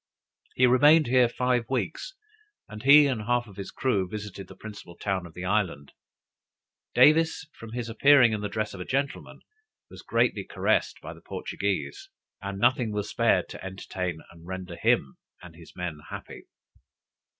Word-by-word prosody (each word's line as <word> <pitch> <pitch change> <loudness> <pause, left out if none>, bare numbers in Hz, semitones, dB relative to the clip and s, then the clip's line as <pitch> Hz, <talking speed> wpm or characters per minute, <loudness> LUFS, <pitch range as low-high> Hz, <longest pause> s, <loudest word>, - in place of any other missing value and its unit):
He 125 - +4
remained 145 +6 +6
here 125 0 +4
five 125 -1 0
weeks, 135 - -3 0.5
and 110 0 -9
he 145 +2 +8
and 130 -6 -1
half 120 +2 0
of 100 -4 -15
his 100 - -6
crew 100 -8 -1
visited 105 -2 -7
the 95 - -13
principal 100 -4 -11
town 95 -3 -2
of 80 - -17
the 90 - -6
island. 90 -8 -1 1.0
Davis, 160 -1 +4
from 115 0 -11
his 120 -1 -4
appearing 125 0 +5
in 105 - -2
the 105 - -3
dress 110 0 -3
of 95 - -9
a - - -4
gentleman, 140 +7 -3 0.5
was - - -11
greatly - - 0
caressed - - 0
by - - -8
the - - -16
Portuguese, 390 -1 -4 0.3
and 100 -1 -5
nothing 120 +1 +2
was 105 0 -3
spared - - +2
to - - -9
entertain 90 -3 -5
and 85 0 -16
render 95 -1 -6
him 65 -5 +1 0.3
and 85 -2 -12
his 80 -1 -15
men 85 -4 -5
happy. - - -9
105 Hz, 165 wpm, -27 LUFS, 95-125 Hz, 1.0 s, he